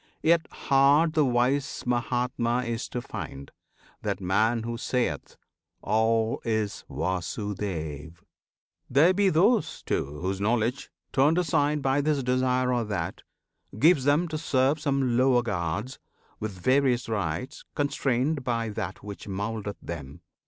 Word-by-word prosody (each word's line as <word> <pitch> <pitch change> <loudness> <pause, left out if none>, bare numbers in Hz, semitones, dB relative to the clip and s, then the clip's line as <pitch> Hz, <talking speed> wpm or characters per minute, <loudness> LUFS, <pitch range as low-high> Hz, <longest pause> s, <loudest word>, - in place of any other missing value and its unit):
Yet 165 -1 +3
hard 140 +4 +3
the 155 -2 +3
wise 130 +2 +1
Mahatma 125 0 0
is 115 -1 -3
to 125 - -4
find, 70 -10 -7 0.5
That - - -2
man 110 +5 +1
who 120 +1 -3
sayeth, 125 +1 -2 0.5
"All 110 +1 +1
is 110 -3 -1
Vasudev!"[FN#13] 85 - -3 0.7
There 155 +8 +5
be 200 +1 +3
those, 195 +7 +2
too, 75 +2 -2
whose 95 +2 -2
knowledge, 120 +5 0 0.2
turned 145 +5 +4
aside 150 -3 +1
By 135 +1 +2
this 145 -2 0
desire 125 0 +1
or 120 -1 +1
that, 100 -6 -3 0.6
gives 150 +2 +5
them 150 +5 +3
to 155 -1 -3
serve 135 -1 +2
Some 135 -5 +1
lower 125 -1 +4
gods, 100 +4 -3 0.4
with 110 -1 -4
various 130 +2 +2
rites, 110 - -3
constrained 140 0 0
By 115 -2 -1
that 95 -3 -5
which 100 0 -8
mouldeth 105 +1 -4
them. 70 -5 -7
120 Hz, 130 wpm, -27 LUFS, 105-140 Hz, 0.7 s, There